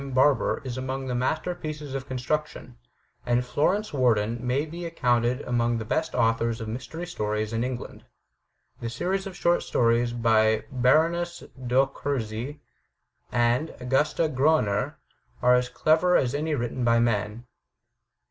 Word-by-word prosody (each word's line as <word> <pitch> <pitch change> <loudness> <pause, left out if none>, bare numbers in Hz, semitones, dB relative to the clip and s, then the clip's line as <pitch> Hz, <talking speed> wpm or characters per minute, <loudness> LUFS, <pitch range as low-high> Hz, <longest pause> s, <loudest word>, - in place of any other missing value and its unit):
Barbour, 130 -1 +3
is 130 -1 -4
among 130 +1 -3
the 125 - -3
master 145 +8 -1
pieces 150 -4 -6
of 135 0 -4
construction, 130 - -3 0.5
and 120 +1 +1
Florence 185 +11 0
Warden 120 -4 +2
may 125 +4 0
be 170 +3 -7
ac 165 - -11
coimted 120 0 +1
among 120 -1 +1
the 110 - -4
best 160 +8 -1
authors 115 0 +1
of 115 - -5
mystery 130 +9 -5
stories 105 -9 -2
in 115 +1 0
Eng 125 0 -2
land. - - -11 0.7
The 115 - -4
series 190 - -2
of 190 - -8
short 175 0 +2
stories 120 0 +2
by 110 -2 +2
Baroness 165 +7 +2 0.2
d'Orczy, 135 0 -1 0.7
and 120 +6 +1
Augusta 135 +6 +1
Groner, 130 -8 +1 0.4
are 125 0 +4
as 125 0 +2
clever 160 +6 +3
as 125 -1 0
any 150 +1 -1
written 120 0 -3
by 115 0 +4
men. 110 0 0
125 Hz, 145 wpm, -26 LUFS, 115-150 Hz, 0.7 s, are